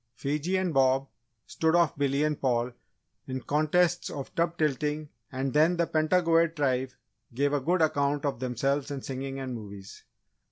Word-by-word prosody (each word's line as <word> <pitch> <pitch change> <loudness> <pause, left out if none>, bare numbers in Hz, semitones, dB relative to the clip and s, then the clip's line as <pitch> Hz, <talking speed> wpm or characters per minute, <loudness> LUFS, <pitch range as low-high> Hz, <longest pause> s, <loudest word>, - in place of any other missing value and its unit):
Fiji 150 +8 -1
and 185 -3 -1
Bob 135 0 +3 0.4
stood 160 +1 +1
off 170 -4 +3
Billy 140 0 +1
and 150 -1 -1
Paul 125 -2 +1 0.6
in 130 0 -3
contests 165 +4 +1
of 140 -2 -7
tub 170 0 0
tilting 150 0 -1 0.2
and 130 0 -2
then 160 +4 +4
the 170 - +2
Pentagoet 165 +1 +2
Tribe 130 -3 0 0.5
gave 140 +2 +1
a 145 - +2
good 170 +4 +2
account 145 -1 +1
of 140 -5 -1
themselves 135 +3 -1
in 140 -2 -5
singing 135 0 -5
and 130 -1 -4
movies. 100 -4 -9
145 Hz, 160 wpm, -28 LUFS, 135-160 Hz, 0.6 s, then